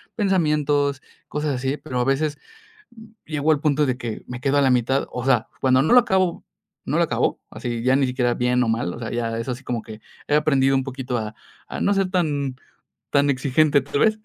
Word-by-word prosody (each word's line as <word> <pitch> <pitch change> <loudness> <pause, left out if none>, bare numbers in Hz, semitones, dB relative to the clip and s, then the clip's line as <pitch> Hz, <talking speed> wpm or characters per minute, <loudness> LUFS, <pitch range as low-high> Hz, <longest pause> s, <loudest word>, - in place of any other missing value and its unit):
pensamientos, 150 -8 +1 0.3
cosas 150 -1 -2
así, 135 +3 -2
pero 130 -6 -4
a - - +2
veces 145 +2 0 0.9
llego 155 0 +1
al 150 - +2
punto 150 -1 +2
de 130 -2 -1
que 115 -4 -6
me 125 0 -7
quedo 140 +1 +1
a - - +4
la 135 -2 +4
mitad, 125 +2 +1
o 125 - -4
sea, 125 -3 +3 0.2
cuando 130 0 +4
no 155 - +3
lo 250 - +9
acabo, 190 -7 +1 0.4
no - - 0
lo - - +4
acabo, - - 0
así 120 -1 -4
ya 130 +1 +3
ni 135 -1 +2
siquiera 125 -1 0
bien 125 0 +1
o - - -1
mal. 115 -5 -1
O - - -8
sea, 115 - -5
ya 115 -1 -2
es 115 - -5
así 125 +1 -5
como 120 -3 -3
que 110 0 -11 0.3
he - - 0
aprendido 135 -3 +3
un 135 - +1
poquito 130 -2 -4
a 110 0 -6 0.3
a - - -6
no 200 - +3
ser 195 -2 +1
tan 145 -8 -1 0.6
tan 145 0 +3
exigente, 140 +2 +2
¿tal 140 +1 -3
vez? 220 -1 +3
135 Hz, 220 wpm, -22 LUFS, 125-150 Hz, 0.9 s, lo